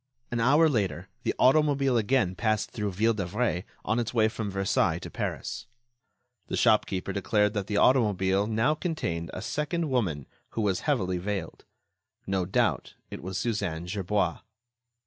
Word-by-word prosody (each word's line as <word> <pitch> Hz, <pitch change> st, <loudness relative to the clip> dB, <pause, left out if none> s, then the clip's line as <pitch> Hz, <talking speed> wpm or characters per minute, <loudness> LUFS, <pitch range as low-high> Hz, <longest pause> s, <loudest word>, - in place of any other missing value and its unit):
An 120 Hz, -, -1 dB
hour 145 Hz, +8 st, +5 dB
later, 95 Hz, -, -1 dB
the -, -, -1 dB
automobile 140 Hz, -1 st, +4 dB
again 115 Hz, -4 st, +2 dB
passed 110 Hz, +2 st, 0 dB
through 105 Hz, -2 st, -2 dB
Ville 110 Hz, +5 st, +2 dB
d'Avray 100 Hz, -1 st, -1 dB, 0.2 s
on 110 Hz, +3 st, +1 dB
its 120 Hz, +1 st, -3 dB
way 110 Hz, -1 st, +4 dB
from 110 Hz, -1 st, -4 dB
Versailles 95 Hz, 0 st, +1 dB
to -, -, -8 dB
Paris. 120 Hz, 0 st, -4 dB, 0.8 s
The -, -, -2 dB
shopkeeper 95 Hz, +1 st, +2 dB
declared 105 Hz, +1 st, +1 dB
that 100 Hz, -3 st, -2 dB
the 105 Hz, -, -1 dB
automobile 100 Hz, -5 st, +3 dB
now 110 Hz, +7 st, +2 dB
contained 155 Hz, -, -3 dB
a -, -, -6 dB
second 150 Hz, +1 st, -2 dB
woman 85 Hz, -, 0 dB, 0.3 s
who 115 Hz, -, -1 dB
was 100 Hz, -3 st, +1 dB
heavily 95 Hz, -10 st, +1 dB
veiled. 95 Hz, -3 st, -4 dB, 0.6 s
No 95 Hz, -2 st, -1 dB
doubt, 95 Hz, -, 0 dB, 0.2 s
it -, -, -6 dB
was 95 Hz, +1 st, -4 dB
Suzanne 95 Hz, -6 st, -2 dB
Gerbois. 95 Hz, -1 st, -1 dB
105 Hz, 150 wpm, -28 LUFS, 95-120 Hz, 0.8 s, hour